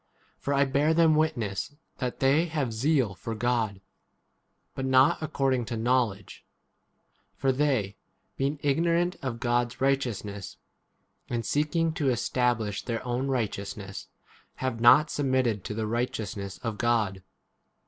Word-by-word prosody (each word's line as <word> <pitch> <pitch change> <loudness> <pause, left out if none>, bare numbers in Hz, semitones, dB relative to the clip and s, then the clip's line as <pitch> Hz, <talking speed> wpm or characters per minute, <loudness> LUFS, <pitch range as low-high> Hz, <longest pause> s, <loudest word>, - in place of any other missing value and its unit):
For 140 - -3
I 140 0 +4
bear 145 +4 +2
them 165 -1 +5
witness 140 -6 -1 0.2
that 125 -2 -3
they 140 +5 +4
have 145 -8 -2
zeal 130 -2 +1
for 115 +4 -6
God, 110 -4 0 0.9
but 135 - -4
not 130 +2 +4
according 135 -5 0
to 120 - -5
8 - - -4
knowledge. 115 -5 0 0.9
For 135 0 +1
they, 130 -8 0 0.4
being 140 +2 -1
igno 165 +4 +2
rant 175 +2 0
of 130 -4 -4
God's 120 0 0
righteousness, 120 -8 -1 0.7
and 115 -2 -2
seeking 160 - +1
to 150 -4 0
establish 120 -3 0
their 115 0 -4
own 125 +2 -1
righteousness, 100 -5 -3 0.5
have 130 -3 -3
not 140 +6 +7
submitted 130 -6 +1
4 95 - -18
to - - -3
the 110 0 -2
righteousness 105 -4 -3
of 115 -3 -3
God. 110 -5 +1
125 Hz, 140 wpm, -27 LUFS, 110-140 Hz, 0.9 s, not